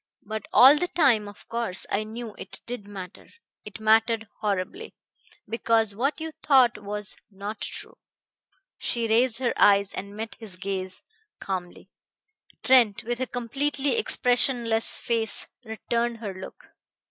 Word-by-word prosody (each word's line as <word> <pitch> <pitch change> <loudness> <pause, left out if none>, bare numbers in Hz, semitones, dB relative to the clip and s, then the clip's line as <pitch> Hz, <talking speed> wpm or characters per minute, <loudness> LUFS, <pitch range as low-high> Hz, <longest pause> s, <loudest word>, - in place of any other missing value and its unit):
But 215 0 -5
all 270 +4 +8
the 355 - 0
time, 260 - +3
of 205 - -13
course, 230 -6 -2
I 205 - +1
knew 220 0 -7
it - - -6
did 235 -4 -6
matter. 190 -2 -9 0.4
It 210 +1 -9
mattered 220 0 +3
horribly. 210 - -3 0.5
Because 225 -1 +2
what 270 +10 -1
you 320 0 -4
thought 260 -7 +3
was 210 0 -2
not 205 +1 -7
true." - - -6 0.8
She 235 -1 -1
raised 230 +1 +3
her 250 -1 0
eyes 200 -1 +5
and 200 +1 -6
met 225 0 -5
his 215 -5 -9
gaze 185 -1 -4 0.4
calmly. 180 -2 -5 0.7
Trent, 245 -6 +5
with 240 +1 -3
a 260 - -1
completely 275 - -1
expressionless 245 - +1
face, 225 -2 -1 0.2
returned 235 +1 -2
her 210 -4 -5
look. 185 0 -11
225 Hz, 135 wpm, -26 LUFS, 205-245 Hz, 0.8 s, all